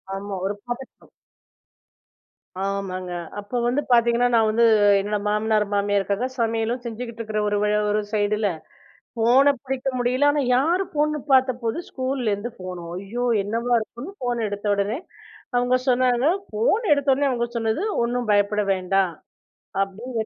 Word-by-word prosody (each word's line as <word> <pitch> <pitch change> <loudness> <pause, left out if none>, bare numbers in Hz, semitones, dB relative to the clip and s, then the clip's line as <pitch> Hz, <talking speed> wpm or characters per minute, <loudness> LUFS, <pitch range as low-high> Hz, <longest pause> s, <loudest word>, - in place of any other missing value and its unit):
ஆமா, 200 0 -5
ஒரு 200 +1 -1
பதட்டம். 240 +2 -8 1.5
ஆமாங்க. 190 -2 -3 0.3
அப்ப 205 0 -11 0.2
வந்து 255 +4 +1
பாத்தீங்கன்னா, 235 0 +4
நான் 225 -1 +4
வந்து 230 +2 +3 0.3
என்னோட 205 +1 -1
மாமனார், 210 0 +1
மாமியாருக்காக 200 +3 0
சமையலும் 230 +2 0
செஞ்சுகிட்டு 235 0 -6
இருக்கிற 215 -1 -3
ஒரு 205 0 +1
வ - - +3 0.3
ஒரு 210 +1 +1
சைடுல, 210 0 +1 0.7
போனை 250 +5 +5
பிடிக்க 265 -1 -3
முடியல. 250 +4 +2
ஆனா, 290 0 +1 0.2
யார் 335 +8 +2
போன்னு 300 0 +1
பாத்தப்போ, 255 -3 +3 0.2
ஸ்கூல்ல 260 -4 -1
இருந்து 205 +4 -3
போன். 180 -1 -6
அய்யோ! 205 +7 -3 0.2
என்னவா 230 +4 -1
இருக்கும்னு 240 - -8
போன் 240 -2 0
எடுத்த 205 +1 -5
உடனே 200 +5 -1 0.6
அவங்க 245 +1 +3
சொன்னாங்க, 250 0 +3 0.3
போன் 235 - +1
எடுத்த 285 -1 +2
உடனே 280 +2 +2
அவங்க 240 -2 0
சொன்னது 225 +7 0 0.2
ஒண்ணும் 240 0 -1
பயப்பட 205 0 +2
வேண்டாம். 185 -1 +1 0.7
அப்படடி 220 +4 -4
230 Hz, 135 wpm, -23 LUFS, 205-250 Hz, 1.5 s, போனை